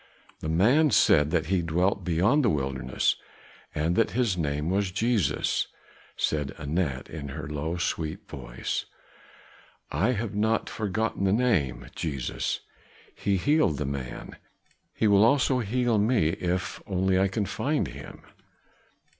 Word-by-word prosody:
"The 80 - -4
man 120 - +4
said 75 - +4
that 80 -1 +1
he 95 -2 +1
dwelt 90 +4 0
beyond 95 - +3
the 115 - +4
wilderness 65 -3 0 0.6
and 80 +3 +1
that 115 - +3
his 120 -7 +2
name 75 0 -1
was 100 0 +1
Jesus," 100 - +1 0.5
said 75 -3 -1
Anat 70 -3 -2
in 75 -2 -7
her 70 - -6
low, 75 +3 -3
sweet 90 +3 -3
voice. - - -4 1.1
"I 100 - +2
have 110 -2 -3
not 110 +2 0
forgotten 105 -1 -1
the 95 - +3
name, 100 - +1
Jesus. 70 -6 -2 0.5
He 100 -1 0
healed 145 - +2
the 75 - -2
man, 70 -2 -6 0.6
he 110 - +2
will 100 0 +6
also 130 +1 +3
heal 120 0 +1
me 105 -6 +3
if 90 +2 -2
only 95 -1 +1
I 95 - +3
can 100 +2 -1
find - - -1
him." - - -10
95 Hz, 140 wpm, -27 LUFS, 75-110 Hz, 1.1 s, will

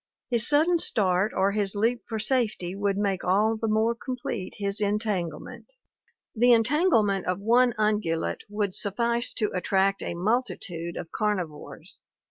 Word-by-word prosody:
His 235 -1 +3
sudden 320 +4 +3
start 195 - +1
or 195 +1 +1
his 200 -1 -1
leap 230 +4 +1
for 225 - -3
safety 215 -6 0
would 200 0 -1
make 200 -3 -1
all 210 +5 +2
the 225 +1 -3
more 220 +2 +2
complete 235 -6 -5
his 200 +1 -2
entangle 200 -6 -1
ment.... - - -11
• - - -45 0.6
"The 245 +1 +5
entanglement 230 - +2
of 180 0 0
one 240 +3 +3
ungulate 210 -6 0
would 205 -2 -2
suffice 235 +5 -1
to 215 -3 -1
attract 195 +2 +1
a - - -4
multitude 180 -5 -2
of 170 -2 -7
carnivores. 185 -8 -4
210 Hz, 150 wpm, -26 LUFS, 190-230 Hz, 0.6 s, The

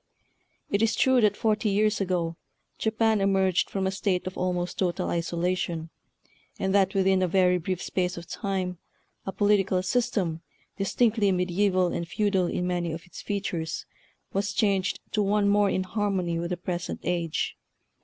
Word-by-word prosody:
It 200 - +2
is 225 0 +2
true 260 -2 +4
that 210 -2 +3
forty 215 -1 +1
years 210 +1 +2
ago 175 -3 -1 0.4
Japan 220 -1 +2
emerged 190 -2 +2
from 195 -1 -2
a 190 - +1
state 190 -1 -1
of 185 - -5
almost 180 -1 -2
total 180 -3 0
isolation, 170 -1 -1 0.7
and 190 0 -1
that 195 -1 +3
within 190 -1 +3
a 185 - +2
very 180 0 +3
brief 180 +1 -3
space 180 -1 -1
of 170 - -7
time 185 -1 -3 0.5
a - - -1
political 200 -2 +2
system, 185 -6 0 0.3
distinctly 210 +1 +2
mediaeval 185 0 +2
and 170 - -3
feudal 195 0 +1
in 180 - -2
many 175 -2 -1
of 165 - -7
its 180 - -10
features, 175 -5 -3 0.5
was 200 +1 -1
changed 195 -3 +1
to 210 - +1
one 205 0 +2
more 205 0 +4
in 185 - 0
harmony 185 -3 -1
with 170 0 -3
the 180 - -2
present 175 0 -4
age. 170 -2 -1
190 Hz, 160 wpm, -27 LUFS, 180-205 Hz, 0.7 s, true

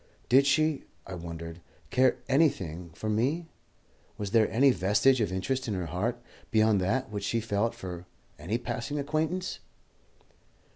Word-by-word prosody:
Did 135 +3 +6
she, 155 +1 +2 0.2
I 95 - -8
wondered, 85 -1 -7 0.3
care 130 0 +4
anything 110 - +1
for 110 - -5
me? 135 +11 0 0.7
Was 100 -2 -4
there 110 -1 +4
any 135 +4 +5
vestige 110 +5 +3
of 105 - 0
interest 125 +8 -1
in 105 - -1
her 90 -2 -2
heart 105 +9 -2 0.3
beyond 110 -3 +3
that 115 +6 0
which 100 -1 -4
she 115 +3 0
felt 115 +1 0
for 90 -5 -7 0.3
any 105 +7 -1
passing 130 +4 -4
acquaintance? 155 +6 -1
115 Hz, 145 wpm, -29 LUFS, 95-135 Hz, 0.7 s, Did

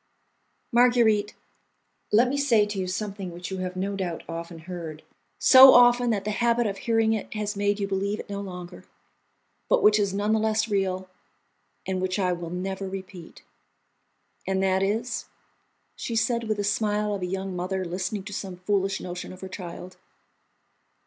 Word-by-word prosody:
"Marguerite, 235 -4 +3 0.8
let 230 +4 +5
me 265 - -1
say 250 -7 +3
to 205 -1 -4
you 185 - -2
something 200 0 -4
which 175 +2 -7
you 190 - -3
have 185 0 -4
no 195 +2 -2
doubt 180 -4 -4
often 170 0 -6
heard, 165 -2 -8 0.3
so 265 0 +9
often 245 0 +6
that 205 -3 -1
the 210 - -1
habit 235 +2 +1
of 200 -2 -3
hearing 225 -1 +2
it 215 - -4
has 210 0 -2
made 205 +1 0
you 200 - -1
believe 200 +2 -2
it - - -7
no 200 0 -5
longer, 180 -2 -8 0.9
but - - +3
which 210 0 +6
is 200 -2 +1
none 205 +2 0
the 220 - +2
less 220 0 +1
real, 190 -3 -1 0.8
and 185 -1 -2
which 185 +1 -1
I 185 -3 +1
will 170 -1 -6
never 190 +2 -4
repeat." 190 -3 -9 1.0
"And 190 0 0
that 190 0 +2
is...?" 220 +5 -1 0.7
she 230 - -4
said, 235 +1 +1
with 215 -1 0
the 205 - -1
smile 210 0 0
of 200 - -4
a 180 - -2
young 190 0 -4
mother 185 +1 -2
listening 185 +3 -3
to 205 +1 -8
some 190 -1 -5
foolish 195 +1 0
notion 180 0 -6
of 185 - -12
her 190 - -6
child. 180 -1 -8
195 Hz, 175 wpm, -26 LUFS, 185-215 Hz, 1.0 s, so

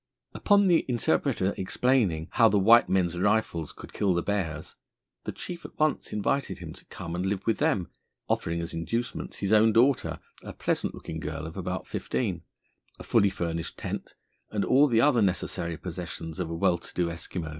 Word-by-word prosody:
Upon 205 -1 +4
the 175 -3 +4
interpreter 120 -5 +1
explaining 95 -6 +1
how 115 -2 +5
the 105 - +2
white 115 +5 +6
men's 90 -2 +1
rifles 100 -6 +1
could - - -12
kill 95 -3 +1
the 85 - 0
bears, 80 -7 -3 0.5
the - - -2
chief 175 -1 -7
at - - -11
once 155 -1 0
invited 120 +7 -1
him - - -8
to - - -15
come 85 - -7
and 90 +1 -2
live 95 0 -2
with 115 - +1
them, 90 -4 +1 0.4
offering 85 0 -1
as 85 - -5
inducements 115 +9 -3
his 100 +1 0
own 110 +1 +6
daughter, 125 +4 +3 0.2
a - - -8
pleasant - - -1
looking 80 - -6
girl 80 +1 -5
of 80 - -8
about 90 -1 -4
fifteen, - - -2 0.6
a - - -9
fully 100 - +3
furnished 85 -3 -4
tent, - - -5 0.3
and 105 - -1
all 140 +3 +5
the 115 -4 +3
other 135 -4 +4
necessary 90 -3 -1
possessions 85 -2 -6
of 90 -3 -2
a 85 - -3
well 85 0 +2
to - - -13
do 90 - +1
Eskimo. 85 -1 -5
95 Hz, 185 wpm, -27 LUFS, 85-115 Hz, 0.6 s, white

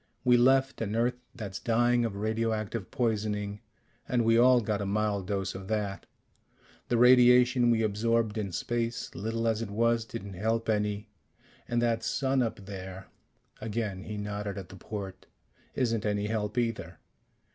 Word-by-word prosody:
We 125 -1 +5
left 135 +2 +3
an 110 -1 -2
Earth 120 +2 0
that's 100 -6 -6
dying 120 0 +2
of 110 -3 -3
radioactive 110 0 -2
poisoning, 105 -5 -1 0.5
and 120 -2 +2
we 115 0 +4
all 125 +1 +6
got 105 -2 -2
a - - -2
mild 100 -2 0
dose 100 -1 -2
of 95 0 -8
that. 105 -2 -2 0.8
The 120 - +1
radiation 125 0 +6
we 115 -1 +3
absorbed 110 +1 +1
in 100 -3 -3
space, 115 +6 -2
little 115 +2 -2
as 110 -1 +1
it 115 - -4
was, 115 +2 +1
didn't 100 -4 -7
help 110 +4 -1
any. 105 0 0 0.6
And 120 0 0
that 115 -1 +1
sun 135 +3 0
up 110 -4 -3
there 95 -1 -8 0.3
" - - -33
again 105 -3 -3
he 105 -1 -5
nodded 105 0 -4
at 95 -3 -7
the 95 - -10
port 95 -1 -7 0.5
"isn't 115 -4 0
any 105 -1 0
help 105 +1 -2
either. 115 -8 -2
110 Hz, 160 wpm, -29 LUFS, 100-120 Hz, 0.8 s, all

